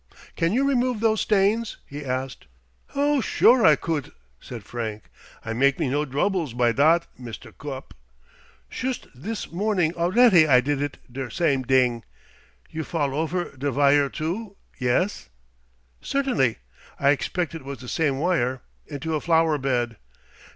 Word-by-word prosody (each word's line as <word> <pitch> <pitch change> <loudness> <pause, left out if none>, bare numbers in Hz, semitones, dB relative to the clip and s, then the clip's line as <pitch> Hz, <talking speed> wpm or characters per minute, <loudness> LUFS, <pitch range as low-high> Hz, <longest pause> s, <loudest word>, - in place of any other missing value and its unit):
"Can 165 +1 +1
you 265 +6 +2
remove 250 -4 +1
those 220 -1 +2
stains?" 210 +2 +1
he 145 +1 -8
asked. 130 - -4 0.5
"Oh, 285 0 +2
sure 240 +1 +4
I 155 -2 +7
couldt!" 155 -4 -3 0.3
said 120 -4 -9
Frank. 110 -1 -5 0.4
"I 115 - -3
make 135 +3 +2
me - - -1
no 145 +2 0
droubles 150 - -1
by 120 -1 +3
dot, 160 +7 +3
Mister 115 -4 -9
Gupp. 135 -2 -8 0.7
Shust 255 0 -4
dis 205 - -6
morning 180 -3 0
alretty 180 0 +5
I 125 -2 +7
didt 145 +2 -1
it 145 0 -3
der 130 0 -5
same 140 0 +1
ding. 125 -2 +2 0.7
You 160 0 -4
fall 145 -4 -2
ofer 160 +2 -2
der 140 +2 -2
vire 140 +1 +3
too, 190 +8 -4 0.2
yes?" 125 - 0 0.7
"Certainly. 250 - 0 0.4
I 140 0 +4
expect 170 +3 -1
it 165 - -7
was 140 0 -6
the 125 +1 -11
same 145 -1 0
wire. 130 -6 0 0.2
Into 155 +2 -4
a 155 - -1
flower 165 -3 +2
bed." 120 -4 -1
150 Hz, 150 wpm, -24 LUFS, 130-185 Hz, 0.7 s, I